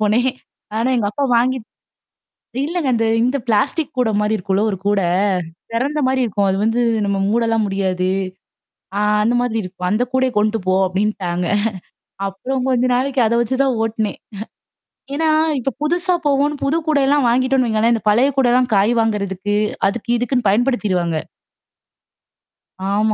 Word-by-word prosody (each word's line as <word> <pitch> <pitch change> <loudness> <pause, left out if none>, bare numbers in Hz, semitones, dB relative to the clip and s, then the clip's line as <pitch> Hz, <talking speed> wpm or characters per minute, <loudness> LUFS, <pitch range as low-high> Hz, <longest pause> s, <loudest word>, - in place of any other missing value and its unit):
போனேன். 230 +5 +2 0.5
ஆனா 230 +3 +1
எங்கப்பா 215 +5 -1
வாங்கி 255 +2 +2 1.1
இல்லங்க 330 -4 -1
அ - - +2
இந்த 225 0 +1 0.2
இந்த 255 +4 +1
பிளாஸ்டிக் 270 +8 0
கூட 240 -3 +2
மாரி 210 +1 +1
இருக்கும்ல 195 +2 0
ஒரு 190 - -3
கூட. 205 -1 +2 0.7
தெறந்த 280 +6 -1
மாரி 260 0 +1
இருக்கும். 205 -2 0
அது 190 - 0
வந்து 230 +2 +1 0.2
நம்ம 200 -1 0
மூடலாம் 225 -1 +1
முடியாது. 185 -2 -1 0.9
ஆ - - 0 0.2
அந்த 240 +2 +2
மாதிரி 225 -2 -1
இருக்கும். 180 0 -5
அந்த 215 +4 +1
கூடயே 260 -1 +1
கொண்டு 215 +1 +1
போ 185 - +2
அப்டின்ட்டாங்க. 185 -2 -1 0.8
அப்புறம் 250 +7 -3
கொஞ்ச 250 -1 +2
நாளைக்கு 265 0 0
அத 230 - +1
வச்சு 255 +3 -2
தான் 260 -3 0
ஓட்டுனேன். 220 -2 -2 1.0
ஏன்னா, 320 +2 +1 0.3
இப்ப 265 +2 -1
புதுசா 350 +4 +1
போவோம்ன்னு, 285 +1 +1
புது 280 +4 +1
கூடல்லாம் 285 -3 +2
வாங்கிட்டோன்னு 255 +1 +2
வைங்களேன், 220 +2 +2
இந்த 225 - -3
பழைய 245 +6 +4
கூடல்லாம் 250 -1 +3
காய் 200 +4 +3
வாங்குறதுக்கு, 205 -2 -1 0.3
அதுக்கு 235 +4 -2
இதுக்குன்னு 245 -1 -1
பயன்படுத்திருவாங்க. 200 -7 +1 1.8
ஆமா. 215 +1 +2
230 Hz, 145 wpm, -19 LUFS, 205-260 Hz, 1.8 s, பழைய